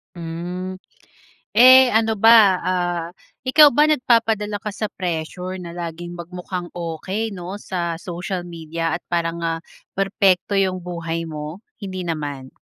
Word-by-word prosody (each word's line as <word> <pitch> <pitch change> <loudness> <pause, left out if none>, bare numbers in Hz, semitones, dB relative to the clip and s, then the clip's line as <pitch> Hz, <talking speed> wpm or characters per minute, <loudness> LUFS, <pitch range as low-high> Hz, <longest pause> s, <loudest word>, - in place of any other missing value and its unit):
Hmm. 175 +2 -5 0.8
Eh 255 +3 +9
ano 225 0 +2
ba, 225 +3 +7 0.3
ah, 175 -2 -1 0.4
ikaw 295 +2 +7
ba 300 +5 +4
nagpapadala 225 -7 +1
ka 210 - -8
sa 215 +2 -3
pressure 180 +1 -4
na 175 -2 -8
laging 175 0 -6
magmukhang 180 +1 -6
okey, 175 +6 -3
'no, 185 0 -6
sa 175 -4 -3
social 175 +2 -5
media 165 -1 -4
at - - -5
parang 170 -1 -1
ah, 165 0 -2 0.3
perpekto 195 -1 +2
'yung 185 -1 0
buhay 165 -1 -4
mo? 155 +4 -7 0.2
Hindi 185 -3 -5
naman? 145 -5 -4
180 Hz, 135 wpm, -21 LUFS, 165-200 Hz, 0.8 s, Eh